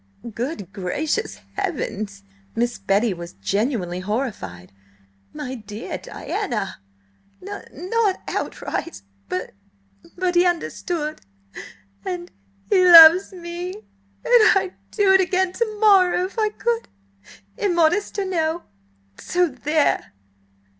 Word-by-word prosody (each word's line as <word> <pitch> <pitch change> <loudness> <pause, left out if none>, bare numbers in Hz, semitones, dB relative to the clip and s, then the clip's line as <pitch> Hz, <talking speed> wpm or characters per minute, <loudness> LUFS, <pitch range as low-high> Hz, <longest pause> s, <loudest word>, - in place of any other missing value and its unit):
"Good 230 - -5
gracious 300 - -2
heavens!" 215 - -4 0.3
Miss 240 +1 -1
Betty 200 +2 +1
was 170 -1 -9
genuinely 185 - -2
horrified. 185 - -4 0.6
"My 290 -4 -6
dear 215 -2 -7
Diana!" 210 - -4 0.6
"N 400 +2 -7
not 400 +1 0
outright–b 100 - -5 0.8
but 365 0 0
he 350 0 +5
understood–and–he 100 - -4
loves 340 +2 +9
me! 350 0 -6 0.5
And 480 -3 +6
I'd 380 -1 -2 0.2
do 400 -3 +3
it 385 - +6
again 370 0 +1
to 435 -1 -2
morrow, 370 -4 +5
if 390 +4 -6
I 430 -1 +2
could–immodest 330 - -2
or 400 - 0
no! 335 -2 -1 0.6
So 355 -1 +1
there!" 295 - 0
310 Hz, 95 wpm, -22 LUFS, -, 0.8 s, loves